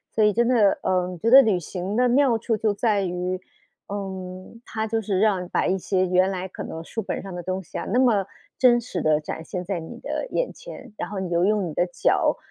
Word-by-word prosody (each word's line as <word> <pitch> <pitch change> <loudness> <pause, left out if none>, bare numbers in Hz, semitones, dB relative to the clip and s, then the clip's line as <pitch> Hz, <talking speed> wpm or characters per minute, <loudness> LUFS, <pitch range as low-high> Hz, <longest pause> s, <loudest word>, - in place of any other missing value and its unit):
所 220 - +3
以 210 0 +4
真 235 +2 +2
的， 225 -6 +3
嗯， 180 -1 -1
觉 225 - +1
得 270 +3 +9
旅 205 -6 +2
行 180 +4 -5
的 250 +1 +3
妙 255 -2 +4
处 225 +1 -1
就 215 -1 0
在 205 -1 +1
于， 180 0 -2 0.5
嗯， 190 +1 -7
它 220 0 -3
就 225 +1 -1
是 195 -3 -1
让 190 -4 +1
把 - - 0
一 190 - +1
些 185 0 0
原 185 +2 +3
来 185 0 -4
可 185 - -8
能 165 - -6
书 225 - -4
本 200 - -4
上 195 -1 -8
的 175 - -6
东 185 +2 -2
西 175 - -8
啊， - - -3
那 245 - +1
么 225 -7 +3 0.3
真 245 -2 +5
实 215 -7 -4
地 155 -1 +3
展 155 +1 -6
现 180 +2 -5
在 190 0 -2
你 160 - -9
的 - - -3
眼 - - -1
前， 270 - -11
然 - - -4
后 200 -1 -4
你 190 -2 -3
就 170 0 +1
用 205 -1 +2
你 160 - -6
的 175 - +2
脚 180 - +1
195 Hz, 260 characters per minute, -24 LUFS, 180-225 Hz, 0.5 s, 得